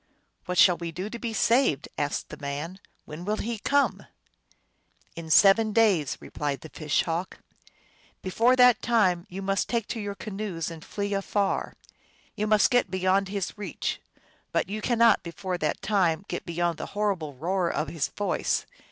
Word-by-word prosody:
" - - -46
What 180 0 -2
shall 180 -1 +6
we 170 -1 -5
do 185 +5 -5
to 235 - -6
be 235 -1 -3
saved? 230 - +2
" - - -38
asked 145 0 -2
the - - -8
man. 150 +6 -5
" - - -42
When 155 +3 -8
will 210 +3 -1
he 230 0 -3
come? 285 +6 +1 0.3
" - - -40
" - - -38
In 165 -1 -8
seven 205 +6 +6
days," 200 - +3
replied 145 -2 -4
the 160 - -10
Fish 150 -1 0
Hawk. 170 +2 -3 0.4
" - - -33
Before 230 +7 +3
that 250 -2 +6
time 190 -7 +2
you 195 +2 -6
must 195 0 0
take 230 -3 0
to 230 - -3
your 205 -1 -4
canoes 195 -6 -4
and 160 -1 -9
flee 205 0 -3
afar. 200 0 -1 0.6
You 210 - -1
may 215 0 +5
get 245 -5 +2
beyond 190 +1 +1
his 200 -2 -3
reach, 195 -7 -3 0.5
but - - 0
you 215 +2 -4
cannot 230 -2 +4
before 180 +1 -5
that 150 -2 -2
time 190 -3 +1
get - - -5
beyond 170 -1 -1
the - - -4
horrible 185 -9 -1
roar 175 +5 0
of 155 - -2
his 165 -4 -1
voice. 205 - -1
195 Hz, 185 wpm, -27 LUFS, 170-215 Hz, 0.6 s, shall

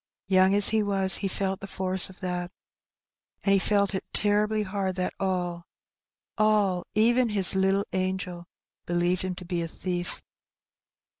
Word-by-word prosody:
Young 190 0 +3
as 205 0 +9
he 220 0 +1
was, 195 -2 +2
he 200 - -2
felt 190 0 -2
the 195 - -8
force 190 -1 0
of 190 - -16
that. 180 -1 -3 0.9
And 195 - +3
he 195 - +4
felt 200 +1 +1
it 190 - -3
terribly 210 +1 +1
hard 190 -1 -3
that 185 -1 -2
all 175 -3 -3 0.3
— - - -65
all! 205 -4 +2
even 235 +3 +3
his 200 -3 +4
Uttle 195 +1 +1
angel 185 -2 -3 0.2
— - - -64
believed 175 +1 0
him 185 -1 -4
to 180 - -10
be 175 -1 -3
a 165 - -3
thief. 175 +1 -4
190 Hz, 165 wpm, -26 LUFS, 180-200 Hz, 0.9 s, as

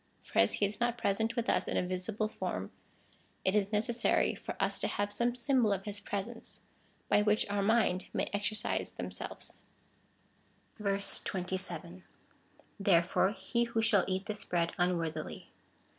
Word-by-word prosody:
For - - -1
as 100 - +5
he 205 - +2
is 200 +2 -4
not 240 0 +1
present 220 +2 0
with 235 -2 -1
us - - +2
in - - 0
a - - +2
visible 185 +4 -1
form, 215 - -4 0.7
it 190 - +3
is 205 -1 +2
necessary 230 +3 +2
for - - -6
us - - +1
to - - 0
have 205 0 -1
some 240 +3 +1
symbol 245 -2 +2
of 195 -1 0
his 205 -1 -2
presence, 205 +3 -5 0.5
by 210 - +4
which 210 +1 +2
our 205 0 +1
minds 200 -3 +3
may - - -1
exercise 205 +1 -1
themselves. - - -6 1.2
27. 185 -3 -2 0.8
Therefore 190 0 +3
he 235 +1 0
who 225 -1 0
shall 205 -3 +5
eat 190 0 -1
this 210 -1 -3
bread 170 -3 0
unworthily. 175 -3 -1
205 Hz, 150 wpm, -32 LUFS, 185-220 Hz, 1.2 s, as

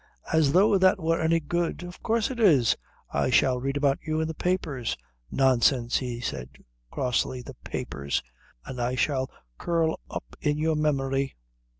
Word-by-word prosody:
"As 155 -3 +4
though 195 +2 +5
that 190 +2 +4
were 165 0 +1
any 165 +1 +3
good." 170 +2 -2
"Of 175 0 -9
course 230 +3 +1
it 250 - -6
is. 150 - +5 0.4
I - - +1
shall 125 -1 +3
read 135 +2 -2
about 140 -1 +2
you 155 -1 -2
in 160 - 0
the 160 - -3
papers." 155 -9 -1 0.3
"Nonsense," 130 -2 +3
he 125 -2 -4
said 65 - -4 0.4
crossly. 125 - -1
"The - - -9
papers!" 70 +1 -3 0.4
"And 125 -2 -5
I 125 +1 0
shall 130 -1 0 0.3
curl 165 -2 0
up - - -7
in 150 -1 +1
your 160 +1 +1
memory." 135 -3 0
145 Hz, 165 wpm, -27 LUFS, 130-165 Hz, 0.4 s, though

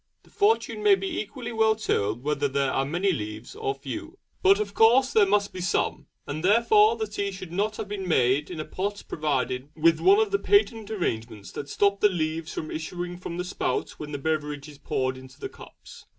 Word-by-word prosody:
The - - -23
fortune 425 +1 +1
may 415 -2 +6
be 385 -3 -3
equally 240 +3 -7
well 220 -1 +3
told 115 - -1
whether 145 -1 0
there 140 0 0
are 135 - 0
many 175 +7 +1
leaves 110 - -5
or 135 - -2
few; 325 - -7 0.2
but 390 +1 +5
of 425 - -3
course 255 +5 +5
there 210 -2 +5
must 205 0 +1
be 185 - -6
some, 160 -4 -1 0.2
and 155 +3 -5
therefore 215 +2 +5
the 220 -1 -2
tea 200 -1 -3
should 185 -3 -8
not 210 +4 -1
have - - -4
been 195 -2 -4
made 135 -2 +2
in 175 -3 -6
a 155 - -3
pot 200 +2 -4
provided 135 -3 -1
with 165 +1 +3
one 390 +2 +6
of 435 -1 +2
the 400 - +2
patent 230 - +2
arrangements 115 - -3
that 140 - -7
stop 200 +4 +2
the 210 - +5
leaves 160 -2 -2
from 155 - -5
issuing 175 +2 -5
from 170 -1 -6
the 180 - -3
spout 180 - -2
when 150 -1 -6
the 145 - -3
beverage 150 -1 -2
is 145 -2 -13
poured 130 -2 -2
into 130 0 -15
the - - -5
cups. - - -14
180 Hz, 210 wpm, -26 LUFS, 145-220 Hz, 0.2 s, may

